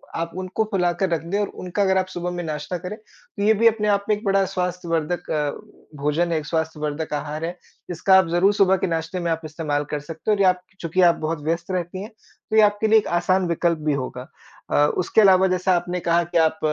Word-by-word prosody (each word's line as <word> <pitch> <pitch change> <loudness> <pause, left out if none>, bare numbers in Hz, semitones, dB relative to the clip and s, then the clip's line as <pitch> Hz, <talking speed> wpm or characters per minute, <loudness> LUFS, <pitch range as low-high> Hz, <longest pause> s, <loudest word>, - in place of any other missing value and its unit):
आप 165 0 -3
उनको 185 +3 -1
फुलाकर 180 -1 +1
रख 165 -3 0
दें 200 - +1
और 205 - 0
उनका 185 +3 -2
अगर 190 -1 +3
आप 185 0 +1
सुबह 180 -1 -4
में 175 0 -4
नाश्ता 155 +2 -4
करें, 180 +4 -7
तो 215 -2 -10
ये 215 +2 +5
भी 225 +2 +4
अपने 215 -2 +2
आप 200 -1 +1
में 210 - +4
एक 210 - -11
बड़ा 195 0 +3
स्वास्थ्यवर्धक 175 -3 -2
अ, 150 -2 0 0.5
भोजन 155 +4 +1
है, 165 - +1
एक 155 - -4
स्वास्थ्यवर्धक 155 -1 -3
आहार 150 +2 -3
है। 175 +2 -5 0.3
इसका 190 +3 +4
आप 190 -2 +4
ज़रूर 175 +4 +3
सुबह 195 -2 +3
के 190 - -1
नाश्ते 165 +2 -3
में 170 -1 -1
आप 165 0 -1
इस्तेमाल 150 -2 -2
कर 150 - -1
सकते 160 +7 -4
हो - - +4
और 200 - -1
ये 190 - +5
आप 180 0 +2 0.2
चूँकि 170 +2 0
आप 175 -2 +6
बहुत 160 -1 -2
व्यस्त 165 +3 -2
रहती 185 +1 -3
हैं, 210 - -8 0.4
तो 220 - -1
ये 220 - +7
आपके 205 +1 +3
लिए 220 +1 +6
एक - - -6
आसान 185 +1 +1
विकल्प 170 0 +1
भी - - +3
होगा। 125 -1 -5 0.4
अ, - - +1 0.2
उसके 185 +4 +3
अलावा 190 -2 +6
जैसा 185 0 +1
आपने 175 +1 -2
कहा 170 +1 +3
कि - - +1
आप 160 0 -6
175 Hz, 240 wpm, -22 LUFS, 160-190 Hz, 0.5 s, ये